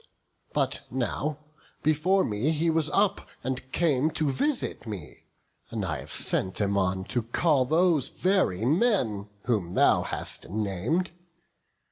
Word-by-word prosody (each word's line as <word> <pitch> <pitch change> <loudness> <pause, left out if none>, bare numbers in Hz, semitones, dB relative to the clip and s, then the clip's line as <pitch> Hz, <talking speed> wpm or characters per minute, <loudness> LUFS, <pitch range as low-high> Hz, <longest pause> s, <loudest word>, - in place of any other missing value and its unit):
But - - 0
now, 130 +4 -2 0.5
before 160 +6 +3
me 105 +7 0
he 160 +1 +1
was 160 -1 +1
up, 200 0 +1 0.2
and 130 0 -4
came 155 -3 +2
To 155 -2 0
visit 260 - -1
me; 100 -8 -8 0.4
and 110 -3 -3
I 80 -5 -2
have - - -10
sent 95 0 0
him 100 -1 +1
on 95 -1 +1
To 120 +5 -1
call 130 +4 +2
those 160 -1 +3
very 180 - +1
men 130 - +1 0.2
whom 100 -8 -1
thou - - +5
hast - - -5
nam'd. 110 - -1
130 Hz, 135 wpm, -27 LUFS, 105-165 Hz, 0.5 s, thou